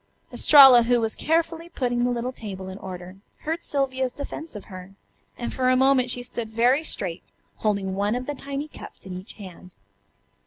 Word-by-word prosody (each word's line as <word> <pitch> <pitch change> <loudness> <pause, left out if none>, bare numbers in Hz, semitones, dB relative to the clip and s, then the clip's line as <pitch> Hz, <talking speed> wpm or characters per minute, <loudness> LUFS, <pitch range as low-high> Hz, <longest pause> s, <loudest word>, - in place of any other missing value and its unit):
Estralla, 270 -5 +8
who 240 +1 +2
was 225 -1 -1
carefully 330 +1 -1
putting 245 -5 -1
the 245 - +2
little 245 +1 -2
table 195 -6 -8
in 190 +1 -8
order, 185 0 -9 0.2
heard 325 +2 -3
Sylvia's 260 -2 -1
defense 300 +1 -7
of 210 - -8
her, 185 0 -11 0.4
and 240 - -4
for 255 -1 +1
a 255 - +4
moment 265 -1 +3
she 245 0 -1
stood 235 -2 -5
very 245 +7 +2
straight, 185 - -2 0.4
holding 200 -3 -1
one 205 +3 0
of 250 +1 -4
the 290 - -3
tiny 280 +1 -5
cups 310 - -13
in 185 -1 -7
each 185 +4 -8
hand. 185 -3 -12
245 Hz, 185 wpm, -24 LUFS, 195-270 Hz, 0.4 s, Estralla